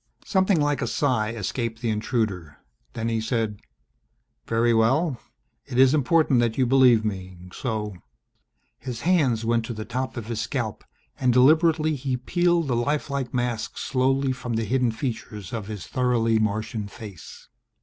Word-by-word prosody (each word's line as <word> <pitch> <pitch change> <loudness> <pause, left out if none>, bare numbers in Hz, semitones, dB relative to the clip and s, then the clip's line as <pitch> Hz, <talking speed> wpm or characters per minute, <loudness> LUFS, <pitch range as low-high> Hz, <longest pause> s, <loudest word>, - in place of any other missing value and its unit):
Something 190 -3 +2
like 145 -1 +1
a - - -1
sigh 125 -7 +1
escaped 115 +1 -3
the 115 -1 -1
intruder. 105 - -2 0.4
Then 115 - -3
he 115 -1 0
said, 110 -3 -1 0.9
"Very 115 +1 +2
well. 130 +5 +2 0.5
It 125 - -4
is 130 +1 +6
important 150 -2 +3
that 115 -2 +1
you 130 - +3
believe 125 -3 +5
me, 95 -3 -4 0.2
so 105 -5 -3 0.4
" - - -47
His 120 -1 -5
hands 140 -11 +2
went 115 0 +1
to 120 - -5
the 110 0 -5
top 130 0 -4
of 115 - -4
his 115 -1 -3
scalp 110 -1 -3 0.4
and 130 -2 +3
deliberately 155 +4 +4
he 130 -1 -2
peeled 175 +4 +1
the 125 - 0
life 140 +4 -1
like 135 -3 -2
mask 120 -2 -2
slowly 135 +1 +1
from 125 -2 -4
the 115 0 -1
hidden 125 +2 +1
features 110 - -5
of 110 -4 -4
his 105 -4 -6
thoroughly 120 -3 +1
Martian 110 0 -2
face! 100 -5 -11
120 Hz, 160 wpm, -25 LUFS, 110-135 Hz, 0.9 s, is